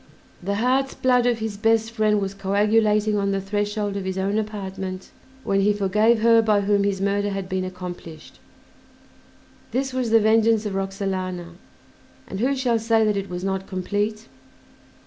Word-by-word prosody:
The 200 +3 -2
heart's 260 +5 +1
blood 250 -1 +2
of 240 -2 +2
his 220 -2 -4
best 225 +1 +2
friend 215 -2 +2
was 195 -1 -3
coagulating 210 +2 +2
on 200 -1 0
the 195 0 0
threshold 205 +1 -2
of 200 - -3
his 190 0 -3
own 200 +3 0
apartment 190 -3 -5 0.3
when 195 0 +1
he 205 +1 +3
forgave 210 +3 +2
her 230 0 +6
by 210 -2 +2
whom 200 0 +2
his 200 -1 0
murder 200 +1 0
had 195 -1 -4
been 185 0 -2
accomplished. 180 -3 -8 1.3
This 265 +1 -2
was 255 -2 -1
the 225 0 +5
vengeance 220 0 +3
of 205 - -3
Roxalana, 190 -2 -3 0.7
and 190 - -6
who 265 +5 +1
shall 245 -3 +1
say 225 0 +2
that 210 -1 +1
it 200 0 -3
was 180 0 -5
not 190 0 -2
complete? 205 +4 -2
205 Hz, 165 wpm, -23 LUFS, 195-220 Hz, 1.3 s, her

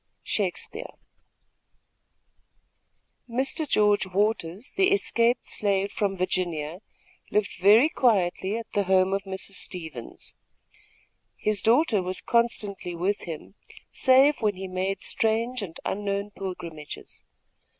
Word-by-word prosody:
Shakespeare. 215 - -3 2.4
Mr. 270 +5 -1
George 210 -2 +3
Waters, 200 - -1
the 380 0 +4
escaped 240 -11 +2
slave 200 -1 0
from 195 -2 -1
Virginia, 175 -3 -1 0.5
lived 210 -3 -1
very 210 +9 +7
quietly 205 - +1
at 230 - -5
the 200 -1 +1
home 190 0 +3
of 195 0 -1
Mrs. 190 0 -5
Stevens. 160 -10 -6 1.0
His 210 -2 0
daughter 230 -2 +3
was 185 +1 -2
constantly 210 -6 -1
with 190 +5 -1
him, 165 +2 -7 0.4
save 270 +3 +5
when 210 -3 +1
he 190 +1 -6
made 185 +1 -2
strange 230 +2 0
and 180 -5 -7
unknown 200 0 -2
pilgrimages. 170 -6 -7
200 Hz, 110 wpm, -26 LUFS, 185-230 Hz, 2.4 s, very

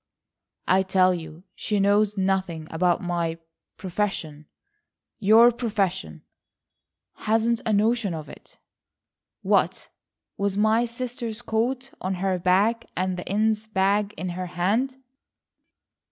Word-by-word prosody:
"I 190 +1 +4
tell 185 -1 +3
you 160 0 -8
she 210 -1 -1
knows 205 +1 +2
nothing 190 -4 -1
about 175 +2 +1
my—profession." 165 -1 -4 0.7
"Your 225 +3 +7
profession!" 195 - -2 1.0
"Hasn't 225 +1 +2
a - - +2
notion 215 -2 +1
of 155 -2 -7
it." - - -14 0.9
"What, - - +1 0.5
with 200 0 -1
my 220 +3 +3
sister's 235 -1 -5
coat 250 +4 -1
on 185 +1 -2
her 185 0 -1
back, 200 +6 +2
and 185 0 0
the 180 - -7
Innes' 215 +2 0
bag 205 +1 +1
in 185 - -3
her 180 +1 -4
hand?" 205 +10 0
195 Hz, 110 wpm, -25 LUFS, 180-220 Hz, 1.0 s, Your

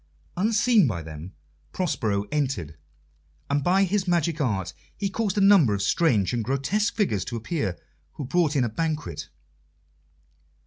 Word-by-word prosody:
Unseen 220 - +3
by 85 -8 -3
them, 80 +3 -9 0.4
Prospero 115 - -1
entered, 130 - -2 0.8
and 145 0 +1
by 190 +4 +3
his 195 0 0
magic 170 -2 +1
art 100 -9 -1 0.2
he 200 -1 -2
caused 210 -1 -1
a - - +3
number 190 - +6
of 100 - -3
strange 115 - +2
and 120 -2 -1
grotesque 140 - 0
figures 110 - 0
to 120 - -6
appear, 115 - -2 0.4
who 145 - -6
brought 155 +2 +1
in 135 - +3
a - - +1
banquet. 150 - -3
145 Hz, 145 wpm, -25 LUFS, -, 0.8 s, number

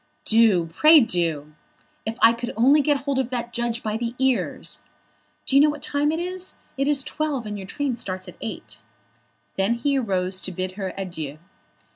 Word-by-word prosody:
"Do; 220 -6 +4
pray 310 - +7
do! 165 - -1 0.5
If 225 +1 -3
I 230 - +8
could 240 +1 -5
only 275 +6 +5
get 285 -1 +1
hold 280 -1 -1
of 260 -2 -1
that 240 -1 -4
judge 235 -1 -2
by 215 0 -1
the 235 +1 -3
ears! 265 -1 -1 0.7
Do 270 - 0
you 275 - +8
know 300 - +5
what 295 -1 -5
time 290 +1 +1
it 320 - -2
is? 365 +1 -3 0.2
It 275 0 0
is 290 -2 +2
twelve, 290 -6 -2
and 210 -1 -4
your 195 -2 -7
train 280 +4 -2
starts 185 -5 -6
at 180 - -9
eight." 225 - -7 0.8
Then 195 +5 +2
he 275 +3 +1
arose 185 -4 -1
to 185 - -4
bid 185 +1 -3
her 190 -1 -4
adieu. 160 -6 -5
235 Hz, 190 wpm, -24 LUFS, 190-280 Hz, 0.8 s, I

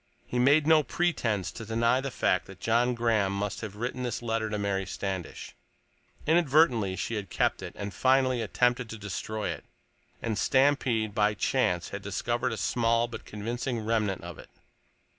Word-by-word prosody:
He 125 - -2
made 145 +4 +5
no 160 0 +6
pretense 120 - -1
to 115 - -8
deny 115 +3 +2
the 140 - -3
fact 90 -7 0
that 95 -1 -12
John 120 +2 +2
Graham 115 -4 +1
must 100 +1 -3
have 105 -3 -6
written 120 +3 -4
this 120 -1 -3
letter 115 -1 -1
to 105 - -2
Mary 100 -2 -1
Standish; 95 -2 -5 0.7
inadvertently 145 - +3
she 115 - -3
had 105 -3 -4
kept - - 0
it, - - -8
had 100 -1 -5
finally 130 -2 +3
attempted 125 +2 +1
to 115 - -6
destroy 105 +1 -4
it, - - -5 0.6
and 110 -3 -2
Stampede, 130 -6 +2
by 105 0 +2
chance, 90 -3 0
had 100 - -6
discovered 120 +5 -1
a 115 - -3
small 115 +1 +1
but 120 - -9
convincing 115 +2 -4
remnant 110 -5 0
of 85 -2 -8
it. - - -12
115 Hz, 170 wpm, -28 LUFS, 105-125 Hz, 0.7 s, no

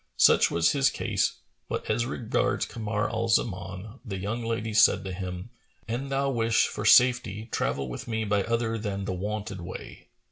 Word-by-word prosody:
Such - - +6
was 85 -1 +3
his 140 -1 +3
case; - - -1 0.3
but - - -3
as 115 +2 0
regards 120 -4 0
Kamar 110 -1 -2
al 115 0 -2
Zaman, 95 0 -1
the 100 -6 -5
young 105 +5 -3
lady 115 -1 -2
said 110 +1 +5
to 95 - -4
him, 90 +3 -6 0.4
"An 125 +5 -3
thou 135 0 0
wish 115 -2 +2
for 105 - -5
safety, 120 -2 +4
travel 70 -1 -1
with - - -7
me 110 -1 -1
by 100 -1 +1
other 115 -1 -1
than 100 -2 -3
the 95 - -2
wonted 100 +1 -4
way." 90 +2 -9
110 Hz, 175 wpm, -27 LUFS, 95-115 Hz, 0.4 s, Such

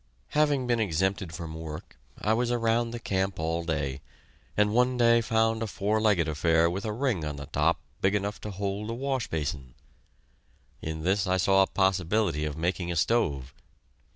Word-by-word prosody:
Having 145 -3 +2
been 120 -1 +1
exempted 95 -2 0
from 80 0 -6
work, 80 -1 -8 0.2
I 110 - +1
was 120 +1 +1
around 115 0 +1
the 120 +1 -5
camp 95 -3 -1
all 80 +1 -1
day, 70 -5 -2 0.6
and 105 0 +3
one 125 +2 +3
day 115 -1 +5
found 115 0 +1
a 115 - -1
four 105 +2 0
legged 100 -7 +3
affair 80 +2 +2
with 95 +5 -4
a 110 - -1
ring 115 - -1
on 75 -1 -3
the 70 0 -7
top - - +1 0.2
big 95 +2 +2
enough 100 0 -2
to 105 - -5
hold 100 +2 -3
a - - -2
wash 135 -1 -2
basin. 70 -5 -4 1.1
In 80 0 -4
this 95 +2 +1
I 95 0 +2
saw 95 +1 +4
a 95 - +4
possibility 95 -4 +1
of 75 -1 -4
making 85 +1 -1
a - - -2
stove. 75 - +1
95 Hz, 180 wpm, -28 LUFS, 80-115 Hz, 1.1 s, day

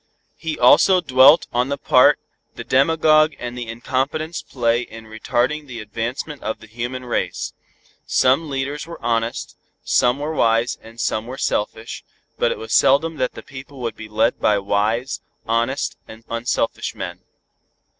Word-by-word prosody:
He 160 -1 -3
also 185 +9 +6
dwelt 135 -1 +6
on 125 +2 +1
the 140 - -1
part - - +5 0.4
the - - -6
demagogue 155 +2 +3
and 120 0 -6
the 120 -2 -5
incompetents 135 +8 -2
play 120 -2 0
in 115 -2 -10
retarding 125 +7 -1
the 120 -3 -7
advancement 120 +7 -5
of 110 - -3
the - - -13
human 120 +3 -5
race. 120 - -2 0.5
Some 135 +5 +2
leaders 140 +3 -3
were 170 - -9
honest, 115 0 -1 0.3
some 125 +1 +2
were 150 +2 -3
wise 115 -3 +2
and 115 +1 -14
some 115 -1 -1
were 130 +2 -7
selfish, 110 0 -2 0.4
but - - +2
it - - -3
was 110 - -6
seldom 150 +4 +3
that 125 -2 -1
the - - -10
people 135 0 -11
would 115 -1 -3
be 110 -1 -10
led 105 +1 +1
by 105 - +3
wise, 110 +7 -1 0.2
honest 120 +5 -1
and 110 +1 -12
unselfish 115 +1 -2
men. - - -6
125 Hz, 155 wpm, -21 LUFS, 115-140 Hz, 0.5 s, also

